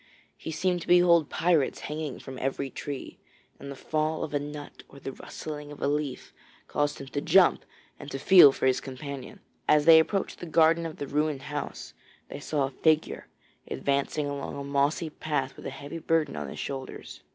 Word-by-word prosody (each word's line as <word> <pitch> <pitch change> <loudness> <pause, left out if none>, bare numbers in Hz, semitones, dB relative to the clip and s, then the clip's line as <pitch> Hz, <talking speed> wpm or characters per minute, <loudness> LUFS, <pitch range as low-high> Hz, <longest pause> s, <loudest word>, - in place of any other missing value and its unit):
He - - -8
seemed 175 +2 0
to - - -9
behold 175 -3 +5
pirates 160 -4 +1
hanging 150 -2 -4
from 130 -1 -9
every 135 0 -2
tree, 140 +1 -7 0.4
and 140 - -8
the 140 - -6
fall 155 +3 -1
of 150 - -5
a 145 - +1
nut 145 0 -8
or 140 - -13
the 135 - -6
rustling 150 +2 -8
of 145 - -10
a - - 0
leaf 145 -2 -3 0.3
caused 145 0 -1
him 140 - -7
to 140 - -3
jump 175 +4 +4 0.4
and 145 - -8
to 135 - -4
feel 150 0 +8
for 135 - -3
his 130 -1 +2
companion. 140 +7 -8 0.3
As 150 -1 +4
they 165 -1 +9
approached 195 +5 -1
the 175 - -7
garden 165 +1 +4
of 155 - -9
the 145 - -4
ruined 145 0 -1
house, 145 0 -6 0.4
they - - -7
saw 145 0 -1
a 135 - -2
figure 155 +3 +1 0.4
advancing 140 +2 -1
along 140 -1 -4
a 140 - -5
mossy 140 +3 0
path 145 -4 -2
with - - -8
a - - -2
heavy 145 +4 -7
burden 165 - 0
on 75 -2 -5
his - - -8
shoulders. 135 -1 -6
145 Hz, 195 wpm, -28 LUFS, 140-160 Hz, 0.4 s, they